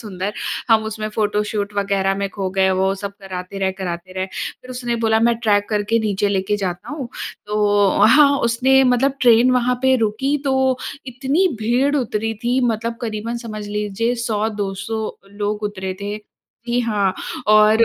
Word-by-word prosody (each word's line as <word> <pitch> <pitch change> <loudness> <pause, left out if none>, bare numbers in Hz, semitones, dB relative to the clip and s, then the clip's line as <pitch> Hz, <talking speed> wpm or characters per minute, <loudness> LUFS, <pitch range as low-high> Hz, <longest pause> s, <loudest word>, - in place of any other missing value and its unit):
सुंदर। 200 -2 -4 0.4
हम 220 -1 +4
उसमें 215 0 -4
फोटोशूट 210 -1 -1
वग़ैरह 195 -1 +1
में 200 0 -1
खो 195 -2 -3
गए, 190 0 +2
वो 190 +1 +1
सब 200 0 -4
कराते 190 0 -6
रहे, 190 -1 0
कराते 185 -1 -5
रहे। 185 0 -2
फिर 250 +6 -7
उसने 240 -2 -2
बोला 220 0 +3
मैं 235 0 +4
ट्रेक 205 -3 +2
करके 210 +1 +1
नीचे 205 -2 0
लेके 195 +1 0
जाता 180 -3 -4
हूँ। 275 -5 -5 0.4
तो 205 -1 +2
हाँ, 285 +4 +7
उसने 260 +3 +3
मतलब 275 +2 +1
ट्रेन 240 0 +6
वहाँ 250 0 +2
पे 260 0 +4
रुकी 235 +6 0
तो 265 -1 +2 0.5
इतनी 270 +9 +1
भीड़ 250 +6 +2
उतरी 225 -3 -1
थी 250 +2 +2
मतलब 230 +1 -3
करीबन 230 +1 -3
समझ 215 -2 -6
लीजिए 210 +3 -1
100-200 210 -1 -2 0.3
लोग 210 +1 -3
उतरे 190 -2 -3
थे। 205 +1 -3 0.5
जी 245 +1 +2
हाँ। 205 -5 0 0.3
और 215 +2 +6
215 Hz, 160 wpm, -20 LUFS, 200-235 Hz, 0.5 s, हाँ